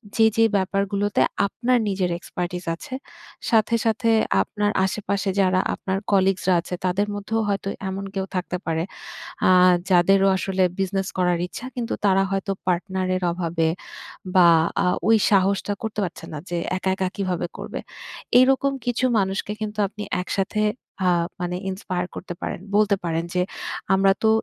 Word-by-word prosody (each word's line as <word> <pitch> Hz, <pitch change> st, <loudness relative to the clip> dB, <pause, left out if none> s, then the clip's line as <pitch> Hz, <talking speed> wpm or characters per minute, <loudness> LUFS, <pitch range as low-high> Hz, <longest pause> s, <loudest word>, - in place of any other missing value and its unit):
যে, 225 Hz, -, +5 dB
যে 225 Hz, -, +6 dB
ব্যাপারগুলোতে 200 Hz, +1 st, 0 dB, 0.3 s
আপনার 250 Hz, +5 st, +1 dB
নিজের 190 Hz, -2 st, 0 dB
expertise 175 Hz, 0 st, -5 dB
আছে। 255 Hz, -, -10 dB, 0.6 s
সাথে, 225 Hz, 0 st, +3 dB
সাথে 225 Hz, +1 st, +1 dB, 0.3 s
আপনার 205 Hz, -, -1 dB
আশেপাশে 200 Hz, 0 st, -2 dB
যারা 185 Hz, -1 st, +3 dB
আপনার 190 Hz, 0 st, -2 dB
কলিগ'স 190 Hz, -1 st, +3 dB
রা -, -, +5 dB
আছে 180 Hz, +1 st, -5 dB
তাদের 185 Hz, +3 st, +1 dB
মধ্যেও 220 Hz, +2 st, -1 dB
হয়তো 195 Hz, -1 st, -1 dB, 0.2 s
এমন 195 Hz, +1 st, -4 dB
কেউ 190 Hz, -1 st, -1 dB
থাকতে 180 Hz, 0 st, -2 dB
পারে। 165 Hz, 0 st, 0 dB, 0.7 s
আ -, -, +6 dB, 0.4 s
যাদেরও 195 Hz, +2 st, +5 dB
আসলে 190 Hz, 0 st, 0 dB, 0.2 s
বিজনেস 195 Hz, 0 st, -1 dB
করার 180 Hz, -1 st, +2 dB
ইচ্ছা 205 Hz, +7 st, -8 dB
কিন্তু 235 Hz, -2 st, -3 dB
তারা 195 Hz, -1 st, +4 dB
হয়তো 195 Hz, 0 st, -1 dB
পার্টনার 185 Hz, +1 st, -1 dB
এর 185 Hz, -, -4 dB
অভাবে 165 Hz, -2 st, 0 dB, 0.7 s
বা 175 Hz, -2 st, +8 dB, 0.4 s
আ -, -, +2 dB, 0.2 s
ওই 225 Hz, -, +7 dB
সাহসটা 200 Hz, 0 st, +2 dB
করতে 215 Hz, -1 st, -2 dB
পারছে 165 Hz, -1 st, -9 dB
না -, -, -4 dB
যে -, -, -3 dB, 0.2 s
একা, 190 Hz, -, -1 dB
একা 190 Hz, -1 st, 0 dB
কিভাবে 185 Hz, -3 st, -1 dB
করবে। -, -, -5 dB, 0.6 s
এইরকম 270 Hz, +2 st, +4 dB
কিছু 245 Hz, +1 st, 0 dB
মানুষকে 195 Hz, +1 st, -1 dB
কিন্তু 215 Hz, -1 st, -4 dB
আপনি 210 Hz, +1 st, -8 dB, 0.2 s
একসাথে 195 Hz, +3 st, -1 dB, 0.5 s
আ -, -, +5 dB, 0.3 s
মানে 180 Hz, 0 st, -2 dB
ইন্সপায়ার 180 Hz, -2 st, -3 dB
করতে 180 Hz, -, -6 dB
পারেন। -, -, -3 dB, 0.2 s
বলতে 210 Hz, -1 st, +4 dB
পারেন 165 Hz, 0 st, -1 dB
যে, 180 Hz, -, +2 dB, 0.5 s
"আমরা 195 Hz, 0 st, +4 dB
তো -, -, +6 dB
195 Hz, 155 wpm, -23 LUFS, 180-205 Hz, 0.7 s, বা